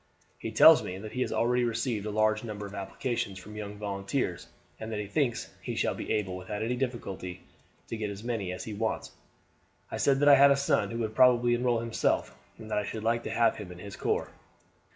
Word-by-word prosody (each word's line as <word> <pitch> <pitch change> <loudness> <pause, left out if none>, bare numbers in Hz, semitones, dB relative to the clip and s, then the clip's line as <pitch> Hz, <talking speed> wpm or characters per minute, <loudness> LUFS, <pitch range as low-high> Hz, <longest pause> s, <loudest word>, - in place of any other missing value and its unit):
He - - -4
tells - - +8
me 90 - -5
that 105 +2 -8
he 125 - -3
has - - 0
already 125 +1 +2
received 115 -2 -1
a - - -2
large 110 +1 +2
number 105 -3 -5
of 100 - -9
applications 100 +1 -3
from 105 +3 -10
young 105 -1 -6
volunteers, 100 0 -3 0.3
and 110 0 -6
that 110 - -2
he 105 - -3
thinks 120 +3 -1
he - - -4
shall - - +1
be - - -5
able 95 -3 -1
without 105 +3 -5
any 120 +2 0
difficulty 100 -8 -4 0.4
to - - -4
get 105 -1 -2
as 100 +1 -7
many 115 -6 -2
as 90 - -5
he 110 - -6
wants. 110 +2 -2 0.8
I - - -3
said 135 -1 +3
that 145 - +3
I 140 -1 +9
had 140 +1 +8
a 140 - +4
son 140 - +1
who 115 - -4
would 110 -1 -2
probably 120 0 +5
enroll 120 -1 +1
himself, 115 -1 0 0.2
and 110 -1 -10
that 105 - +2
I - - -2
should 105 +2 -5
like 115 +1 +1
to - - -3
have 115 -1 +2
him 100 -4 -8
in 90 - -10
his 100 +2 -8
corps. - - -1
110 Hz, 230 wpm, -29 LUFS, 100-120 Hz, 0.8 s, I